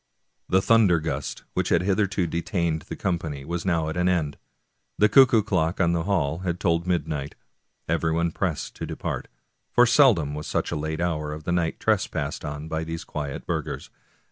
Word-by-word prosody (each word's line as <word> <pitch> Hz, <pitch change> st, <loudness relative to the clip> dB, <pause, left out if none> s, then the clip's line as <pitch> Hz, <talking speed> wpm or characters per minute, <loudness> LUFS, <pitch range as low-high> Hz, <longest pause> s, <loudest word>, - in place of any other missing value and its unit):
The 95 Hz, +1 st, +3 dB
thunder 105 Hz, -8 st, +5 dB
gust 80 Hz, +1 st, -4 dB
which -, -, 0 dB
had 85 Hz, -, +3 dB
hitherto 100 Hz, -1 st, +1 dB
detained 85 Hz, -1 st, -1 dB
the -, -, -4 dB
com 90 Hz, -3 st, -1 dB
pany 70 Hz, -4 st, -6 dB
was 85 Hz, +3 st, -3 dB
now 85 Hz, -3 st, +1 dB
at 80 Hz, -, -3 dB
an 90 Hz, +1 st, +2 dB
end. 80 Hz, -5 st, 0 dB, 0.6 s
The 105 Hz, -, +5 dB
cuckoo 120 Hz, -3 st, +6 dB
clock 90 Hz, -5 st, 0 dB
in 85 Hz, -, +3 dB
the 85 Hz, -1 st, -1 dB
hall 85 Hz, -6 st, 0 dB, 0.2 s
told 85 Hz, -2 st, 0 dB
midnight; 75 Hz, -5 st, -2 dB, 0.5 s
everyone 80 Hz, +1 st, +1 dB
pressed 85 Hz, -3 st, -3 dB
to -, -, -5 dB
depart, -, -, -4 dB, 0.4 s
for 120 Hz, -, +5 dB
seldom 115 Hz, -, +4 dB
was 75 Hz, +1 st, -5 dB
such -, -, -1 dB
a -, -, -1 dB
late 80 Hz, +2 st, -3 dB
hour 75 Hz, -4 st, -1 dB
of 75 Hz, +1 st, -7 dB
the 90 Hz, -, -2 dB
night 85 Hz, -2 st, 0 dB
trespassed -, -, -1 dB
on 75 Hz, +1 st, -5 dB
by 80 Hz, 0 st, -2 dB
these 80 Hz, 0 st, -5 dB
quiet 70 Hz, -2 st, -5 dB
burghers. -, -, -4 dB
85 Hz, 180 wpm, -25 LUFS, 80-90 Hz, 0.6 s, cuckoo